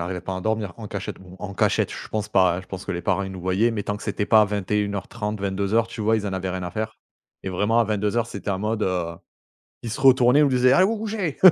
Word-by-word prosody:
arrivait 90 +1 -3
pas 95 0 -4
à - - -4
dormir 110 -1 -1
en 110 - -7
cachette 100 -1 -5
bon 95 0 -13
en 100 -1 -6
cachette, - - +1
je - - -8
pense 105 -1 -3
pas, 95 -3 +3
je - - -18
pense 95 0 -7
que 100 - -2
les 85 - -4
parents 100 - +1
ils 95 - -5
nous 95 - -8
voyaient, 95 +6 +2
mais 110 -3 -3
tant 105 +1 -3
que - - -11
c'était 105 - -2
pas 110 - +6
à - - +5
21:30, 105 +1 -2
22:00 100 +3 +1
tu 115 - -8
vois, 110 +1 +3
ils 105 -2 -2
en 100 - -3
avaient 95 0 -2
rien 90 0 -4
à 90 - -4
faire 110 +3 -4 0.5
et 95 - -4
vraiment 105 +5 +1
à - - +4
22:00 105 +2 0
c'était 105 -2 -7
en 95 - -1
mode, 105 +2 -1
heu, 90 -3 -1 0.7
ils 120 - -5
se - - -4
retournaient, 130 0 +6
ils - - +6
nous 145 - +4
disaient: 125 -1 +4
«Allez 185 +6 +6
vous 225 +2 0
couchez!» 210 -8 -3
105 Hz, 275 wpm, -24 LUFS, 95-115 Hz, 0.7 s, pas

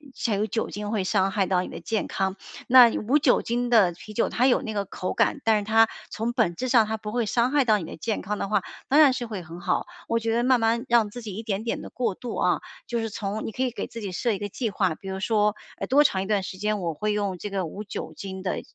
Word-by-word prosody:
才 220 -4 0
有 210 +2 0
酒 225 - -2
精 205 0 -5
会 210 -3 0
伤 190 0 +1
害 195 -2 +1
到 180 -1 +1
你 - - -5
的 - - -8
健 220 -1 -2
康， 190 0 -2 0.3
那 250 -1 +9
无 265 +8 +2
酒 265 -3 +3
精 240 +1 -1
的 210 -7 +5
啤 215 +5 -11
酒 230 - +1
它 250 +2 +2
有 255 - +3
那 220 -4 -5
个 200 -1 -1
口 185 -1 -4
感， 280 - +1
但 220 -2 +3
是 205 - -6
它 225 +1 +5 0.2
从 225 +2 -2
本 225 -9 +1
质 255 +5 -3
上 230 -4 +5
它 220 - -1
不 210 -1 -6
会 240 -1 0
伤 235 +4 +1
害 285 -2 +3
到 215 -3 +4
你 190 - -5
的 160 - -8
健 220 +6 -2
康 205 +2 -3
的 - - -2
话， 210 - +1 0.2
当 290 +3 +4
然 285 -4 +7
是 250 -1 -3
会 210 -6 -6
很 165 +2 -10
好， - - 0 0.2
我 230 - +1
觉 225 0 -1
得 240 +1 +1
慢 255 -2 +4
慢 230 +3 +1
让 230 -3 +3
自 245 +3 -8
己 210 -4 -7
一 220 - -5
点 210 -1 -2
点 230 - -2
的 - - -8
过 230 -6 -2
度 240 +3 -6
啊， - - +2 0.3
就 235 -1 -1
是 225 -1 -2
从 210 0 -4
你 - - -4
可 255 - -2
以 255 - +1
给 - - -4
自 230 - -9
己 200 -3 -5
设 235 +6 0
一 200 - -2
个 205 - -3
计 225 +3 -3
划， 190 -5 0
比 195 - -9
如 190 0 -4
说， 210 0 +2 0.2
哎， - - -3
多 285 +3 +5
长 190 -5 +2
一 - - -6
段 205 -1 +1
时 185 0 -7
间， 210 +1 -1
我 170 -3 -2
会 210 +7 -1
用 200 -3 -1
这 205 - -6
个 195 -2 -2
无 200 +6 -7
酒 205 - -6
精 190 -1 -7
的 185 - -2
215 Hz, 315 characters per minute, -25 LUFS, 195-235 Hz, 0.3 s, 那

